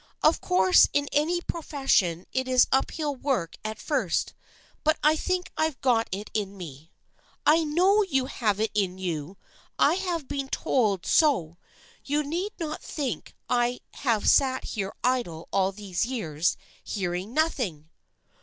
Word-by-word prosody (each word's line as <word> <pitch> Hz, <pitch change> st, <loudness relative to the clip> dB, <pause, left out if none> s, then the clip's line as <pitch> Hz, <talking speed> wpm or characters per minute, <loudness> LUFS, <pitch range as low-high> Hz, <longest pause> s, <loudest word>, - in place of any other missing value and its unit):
" -, -, -32 dB
Of 310 Hz, -, +4 dB
course 185 Hz, 0 st, +5 dB
in 285 Hz, 0 st, +1 dB
any 335 Hz, +4 st, +1 dB
profession 270 Hz, -, 0 dB
it 260 Hz, 0 st, 0 dB
is 255 Hz, -1 st, +5 dB
uphill 290 Hz, +2 st, 0 dB
work 245 Hz, -, -2 dB
at 215 Hz, 0 st, -4 dB
first, 255 Hz, -, -1 dB, 0.5 s
but 310 Hz, +1 st, +3 dB
I 305 Hz, +1 st, +5 dB
think 365 Hz, +3 st, -2 dB
I've 315 Hz, -3 st, 0 dB
got 235 Hz, -4 st, +2 dB
it 200 Hz, +3 st, -5 dB
in 200 Hz, -2 st, -2 dB
me." 160 Hz, -3 st, -10 dB, 0.3 s
" -, -, -35 dB
I 320 Hz, +2 st, +5 dB
know 365 Hz, +7 st, +3 dB
you 270 Hz, -10 st, +1 dB
have 215 Hz, -6 st, -1 dB
it 220 Hz, 0 st, 0 dB
in 190 Hz, -3 st, 0 dB
you! 175 Hz, -1 st, -4 dB, 0.4 s
I -, -, +4 dB
have 350 Hz, -6 st, -2 dB
been 275 Hz, -1 st, -3 dB
told 210 Hz, -11 st, 0 dB
so. 175 Hz, -, +2 dB, 0.4 s
You 295 Hz, +2 st, 0 dB
need 350 Hz, +8 st, -3 dB
not 310 Hz, -2 st, -4 dB
think 260 Hz, -, -4 dB
I 245 Hz, 0 st, +1 dB
have 230 Hz, -6 st, 0 dB
sat 260 Hz, -2 st, +4 dB
here 195 Hz, -3 st, -4 dB
idle 235 Hz, -11 st, -1 dB
all 195 Hz, 0 st, +2 dB
these 195 Hz, -3 st, -3 dB
years 175 Hz, -, -1 dB, 0.3 s
hearing 185 Hz, 0 st, -3 dB
nothing 210 Hz, -, -1 dB
245 Hz, 155 wpm, -26 LUFS, 190-300 Hz, 0.5 s, course